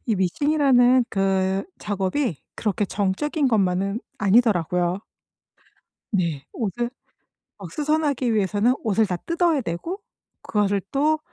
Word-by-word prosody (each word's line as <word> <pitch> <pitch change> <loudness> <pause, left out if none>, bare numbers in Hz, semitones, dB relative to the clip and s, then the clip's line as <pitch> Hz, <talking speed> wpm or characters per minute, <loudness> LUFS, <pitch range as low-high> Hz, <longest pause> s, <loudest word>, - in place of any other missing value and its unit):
이 220 - +1
미싱이라는 255 - +3
그 195 0 0
작업이 200 - -1 0.2
그렇게 210 -1 0
정적인 215 - 0
것만은 195 -1 +1 0.2
아니더라고요. 185 -4 +2 1.1
네. 170 -8 -1
옷을 235 +2 -2 0.7
막 - - -9
수선하기 295 -6 0
위해서는 210 +4 +2
옷을 220 -1 +2
다 180 - -2
뜯어야 335 - +1
되고 260 - -4 0.4
그것을 205 -2 +1
또 305 +3 +2
210 Hz, 260 characters per minute, -23 LUFS, 190-270 Hz, 1.1 s, 미싱이라는